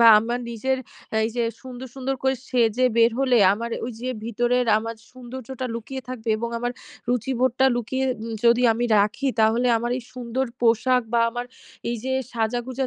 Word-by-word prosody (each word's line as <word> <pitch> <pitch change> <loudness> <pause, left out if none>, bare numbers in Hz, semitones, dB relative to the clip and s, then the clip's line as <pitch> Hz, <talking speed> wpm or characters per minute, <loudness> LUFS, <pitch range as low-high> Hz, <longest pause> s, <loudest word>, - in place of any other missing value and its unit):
বা 235 - +8
আমার 240 +2 -2
নিজের 260 +3 -1 0.5
এইযে 235 +1 -1 0.2
সুন্দর, 255 0 -8
সুন্দর 270 0 -2
করে 265 0 +2
সেজে 240 0 +2
বের 230 0 +6
হলে 265 -2 +3 0.2
আমার 230 +3 -3 0.2
ওইযে, 245 +1 -5 0.2
ভিতরের 240 +2 +1
আমার 230 +1 -5 0.2
সৌন্দর্যটা 255 0 -7
লুকিয়ে 260 +3 -6
থাকবে। 240 -3 -6
এবং 235 +2 -3
আমার 245 +1 -2 0.4
রুচিবোধটা 255 +1 +2
লুকিয়ে 260 +3 -1 0.4
যদি 235 +1 +5
আমি 235 +2 -1
রাখি 210 +7 +1
তাহলে 225 +3 +3
আমার 240 +1 -2
এই - - -8
সুন্দর 250 +1 -2
পোশাক 245 +2 +3
বা 235 - +4
আমার 245 +1 -4 0.4
এইযে, 240 +3 -3 0.2
সাজাগোজা 240 +3 -1
245 Hz, 155 wpm, -24 LUFS, 230-255 Hz, 0.5 s, বা